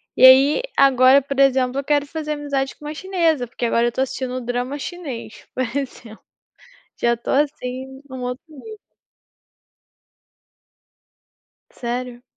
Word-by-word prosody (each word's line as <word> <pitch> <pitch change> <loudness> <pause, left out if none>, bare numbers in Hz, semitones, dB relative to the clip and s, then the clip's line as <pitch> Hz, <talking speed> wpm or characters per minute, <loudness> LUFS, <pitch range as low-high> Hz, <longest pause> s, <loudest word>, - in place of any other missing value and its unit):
E - - +1
aí 270 - +7 0.2
agora 265 0 +6
por 275 0 -5
exemplo 265 -1 +3
eu 280 - -3
quero 290 0 +1
fazer 305 0 -4
amizade 280 -2 -2
com 300 - -14
uma 300 - -4
chinesa, 325 -7 0
porque 240 - -4
agora 235 0 +2
eu - - +2
estou 260 +2 -1
assistindo 255 -1 -4
drama 245 +3 -3
chinês, 275 -9 -7
por 255 - 0
exemplo. 250 -5 -6 0.8
Já 235 0 +3
estou 235 - -3
assim 290 +1 +3
em 265 +1 -6
um 260 - -6
outro 250 +2 -4
nível. 430 +9 -11 2.9
Sério? 245 0 -5
265 Hz, 140 wpm, -21 LUFS, 250-290 Hz, 2.9 s, aí